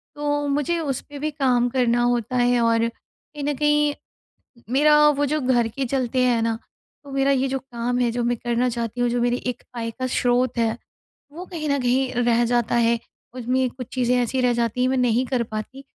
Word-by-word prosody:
तो 290 0 -1
मुझे 295 +4 0
उस 280 -5 -2
पे 290 - -8
भी 305 +2 -2
काम 250 -4 +1
करना 240 -1 +1
होता 245 0 0
है 245 0 +3
और 230 0 +2
कहीं 290 +5 -13
न 290 +1 0
कहीं 295 0 +2 0.8
मेरा 300 +3 +5
वो 290 0 +1
जो 305 - 0
घर 245 -3 +2
के 270 +4 -3
चलते 255 0 0
हैं 240 -2 +2
ना 225 0 0 0.5
तो 285 - -11
मेरा 275 0 +2
ये 270 0 +2
जो 270 0 -1
काम 245 -1 -3
है 245 -1 +2
जो 240 +1 -2
मैं 240 0 +1
करना 240 +1 0
चाहती 235 0 -3
हूँ 245 - +2
जो 240 0 0
मेरी 245 0 +2
एक 245 -1 -3
आय 230 -1 -3
का 255 +2 -4
स्रोत 245 -1 +1
है, 225 -1 +1 0.6
वो 345 +4 -8
कहीं 320 -5 -5
न 280 0 +1
कहीं 255 +1 +1
रह 240 0 +3
जाता 240 -1 +1
है। 235 0 +3 0.3
उसमें 255 +1 0
कुछ 250 -1 -9
चीज़ें 250 -1 +1
ऐसी 255 +2 -1
रह 250 -1 +3
जाती 235 +1 -1
है - - +3
मैं 265 - +1
नहीं 250 0 +2
कर 250 -3 0
पाती 220 +5 -7
250 Hz, 215 wpm, -23 LUFS, 235-275 Hz, 0.8 s, मेरा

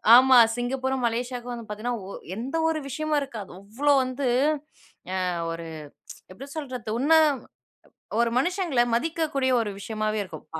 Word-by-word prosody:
ஆமா. 260 +1 +7 0.2
சிங்கப்பூரும், 260 +1 -1
மலேசியாவுக்கும் 245 +1 -3
வந்து 235 -2 -8
பாத்தீங்கன்னா, 225 +4 -3
ஒ - - -8 0.3
எந்த 255 +8 -4
ஒரு 320 -1 0
விஷயமும் 305 +2 0
இருக்காது. 230 -8 -7
அவ்ளோ 250 +9 +1
வந்து 255 +1 -2 0.8
ய - - -2 0.4
ஒரு, 165 0 -5 0.4
ப்ச் - - -10
எப்டி 260 +9 -10
சொல்றது, 255 -7 -5
உன்ன 290 +6 +2 1.1
ஒரு 235 0 +3
மனுஷங்கள 350 -4 +1
மதிக்கக்கூடிய 300 -1 0
ஒரு 210 - -3
விஷயமாவே 215 0 -2
இருக்கும். 160 -6 -10
250 Hz, 135 wpm, -26 LUFS, 225-280 Hz, 1.1 s, ஆமா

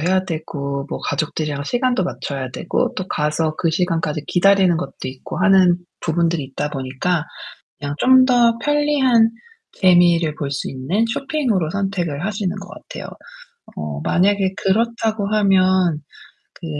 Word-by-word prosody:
해야 185 +3 +1
되고 140 -5 -4
뭐 - - -4
가족들이랑 145 -1 -2
시간 245 - 0
맞춰야 140 - -3
되고 170 - -1
또 185 - -4
가서 155 +1 -1
그 165 - +1
시간까지 165 -3 -1
기다리는 190 -1 +4
것도 175 - -5
있고 130 0 -7
하는 185 -2 +5 0.2
부분들이 165 -2 0
있다 140 +2 -4
보니까 140 +5 -2 0.6
그냥 145 0 -4
좀 260 0 +6
더 240 -2 +3
편리한 290 -6 +3 0.4
재미를 175 -4 +4
볼 140 -2 -4
수 135 - -3
있는 145 - -1
쇼핑으로 240 - -1
선택을 180 -6 -2
하시는 200 -3 -2
것 195 0 -9
같아요. - - -9 0.7
어 75 -1 -5
만약에 190 - +2
그렇다고 220 0 0
하면 185 -5 +3 0.5
그 170 - -11
180 Hz, 295 characters per minute, -20 LUFS, 150-200 Hz, 0.7 s, 좀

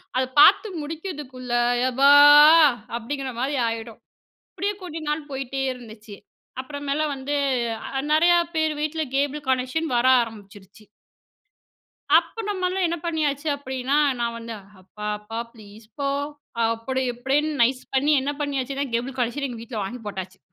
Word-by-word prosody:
அத 255 - +2
பாத்து 430 +9 +7
முடிக்கிறதுக்குள்ள 295 -6 -7 0.4
எபா 270 +3 +4 0.9
அப்டிங்கிற 270 +3 -5
மாரி 275 +3 -1
ஆயிடும். 225 0 -5 0.6
அப்டியே 410 +1 -1
கொஞ்ச 340 -3 -7
நாள் 300 0 -3
போயிட்டே 270 0 -4
இருந்துச்சு, 220 -4 -12 0.4
அப்புறமேல 285 +2 -3
வந்து 275 +2 -4 0.6
அ - - +1
நறையா 345 +3 +5 0.2
பேரு 315 -1 +1
வீட்டில 310 +1 -2
கேபிள் 285 +1 -1
கனெக்ஷன் 260 +5 0
வர 240 +2 +2 0.2
ஆரம்பிச்சுருச்சு. 205 -2 -11 1.3
அப்ப 455 - -2
நம்மலாம் 370 -1 -1
என்ன 340 - -2
பண்ணியாச்சு 310 -3 -1
அப்டின்னா 265 0 -2 0.2
நான் 235 -1 -2
வந்து 230 0 -7 0.3
அப்பா 210 +3 -10
அப்பா 225 +2 -7
ப்ளீஸ்ப்பா 220 +5 -7 0.6
அப்டி 230 +4 -2
இப்டின்னு 275 +5 0
நைஸ் 255 +2 +1
பண்ணி 290 +3 +3
என்ன 280 +2 -2
பண்ணியாச்சுன்னா 275 -1 -2
கேபிள் 250 +3 -2
கனெக்க்ஷன் 250 +4 -1
எங்க 235 -2 -7
வீட்ல 230 -1 -6
வாங்கி 235 +6 -6
போட்டாச்சு. 190 -2 -7
265 Hz, 130 wpm, -23 LUFS, 230-295 Hz, 1.3 s, பாத்து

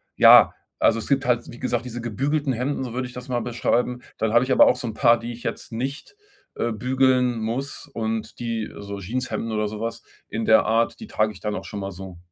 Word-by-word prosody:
ja, - - +8 0.3
also 115 0 +3
es - - -6
gibt 135 -1 +2
halt, 120 -1 0
wie 120 - -11
gesagt, 120 -2 -1
diese 120 -1 -6
„gebügelten 135 +5 -1
Hemden“, 130 +3 -2
so 120 - -6
würde 130 0 -2
ich - - -13
das 125 +1 -8
mal 120 -2 -1
beschreiben. 125 +1 0 0.2
Dann 110 -1 0
habe 120 +2 +4
ich 130 - +1
aber - - +7
auch 125 - +3
so 125 - -5
'n 110 - -4
paar, 120 -1 +4
die 120 +1 -6
ich 120 - -12
jetzt - - -5
nicht, 135 - -5 0.4
äh, 115 - -1
bügeln 125 0 +2
muss 120 +6 -4
und 110 -1 -3
die 115 -2 -3
so 100 0 -6
Jeanshemden 115 +2 -3
oder 105 0 0
so 105 0 -7
was 115 +1 -4 0.3
in 110 +1 -3
der 110 - +5
Art, 115 - +1
die 220 - -8
trage 110 - +1
ich 95 - -13
dann 105 -1 -3
auch - - -5
schon 105 - -6
mal 100 0 -4
so. 95 -1 -9
120 Hz, 240 wpm, -24 LUFS, 110-125 Hz, 0.4 s, ja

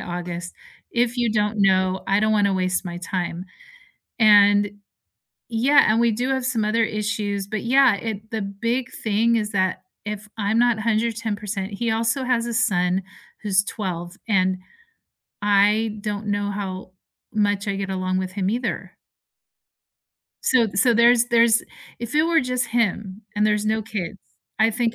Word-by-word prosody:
August. 175 0 -5 0.4
If 240 0 0
you 240 -2 +1
don't 210 -1 0
know, 190 -1 +2
I 195 +2 +2
don't 215 0 +2
wanna 200 -2 +2
waste 185 0 -1
my 175 -1 -6
time. 175 0 -4 0.8
And 205 -1 +5 0.8
yeah, 240 0 +4
and 225 - +2
we 235 -1 +3
do 245 +5 -2
have 260 -2 -1
some 235 -4 0
other 225 +2 +1
issues. 210 -2 -2
But, 215 +1 -4
yeah, 255 -2 +4
it 220 +1 -6
the 220 -1 -2
big 230 +6 -3
thing 225 +2 +2
is 210 -1 -1
that 185 -1 0 0.2
if 210 0 -5
I'm 215 +2 +1
not 240 -2 +3
110% 215 -3 -2
he 230 +2 -1
also 230 +4 0
has 245 -2 0
a 235 - -4
son 190 -6 +1 0.4
who's 200 -2 +2
12, 180 -4 -5
and 185 -3 +2 0.9
I 210 +2 +2
don't 210 0 -4
know 205 0 -1
how 190 -2 -6 0.4
much 205 -1 0
I 195 - -1
get 195 -1 -4
along 185 0 -1
with 185 0 -4
him 195 -1 -1
either. 235 +1 -3 1.5
So 245 -4 +3
so 230 +4 +3
there's 235 +1 +5
there's 235 -1 +4 0.4
if 235 +2 -6
it 305 - +4
were 330 0 +3
just 250 0 -1
him 210 -3 -1
and 210 +1 +2
there's 210 0 +1
no 220 0 0
kids, 205 -4 -5 0.4
I 220 +1 +4
think 230 0 -1
210 Hz, 160 wpm, -22 LUFS, 195-230 Hz, 1.5 s, And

